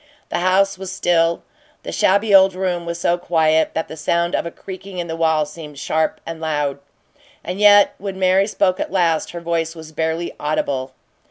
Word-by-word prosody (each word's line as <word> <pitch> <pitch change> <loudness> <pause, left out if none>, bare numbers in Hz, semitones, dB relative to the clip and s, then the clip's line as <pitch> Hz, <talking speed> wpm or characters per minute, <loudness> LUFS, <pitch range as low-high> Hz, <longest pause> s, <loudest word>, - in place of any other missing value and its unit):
The - - -1
house 190 +2 +2
was 190 -1 -6
still; 170 -3 +1 0.4
the - - -6
shabby 200 +2 +2
old 190 -1 +6
room 180 -2 -2
was 170 0 -4
so 175 0 +1
quiet 160 -2 +1
that 160 - -2
the - - -8
sound 170 +2 0
of - - -1
a - - -3
creaking 190 +2 -10
in 175 - -2
the 165 -1 -5
wall 160 -2 +2
seemed 150 -1 -11
sharp 155 +3 -1
and 165 -1 -7
loud. 150 -3 -1 0.6
And 180 +3 -5
yet, 205 -1 +6
when 195 -1 -5
Mary 190 +1 +3
spoke 185 -3 +1
at - - -3
last, 170 -4 +1
her 170 - -7
voice 165 -1 -2
was 160 -1 -10
barely 160 +2 -2
audible. 140 -3 -2
170 Hz, 190 wpm, -20 LUFS, 160-185 Hz, 0.6 s, old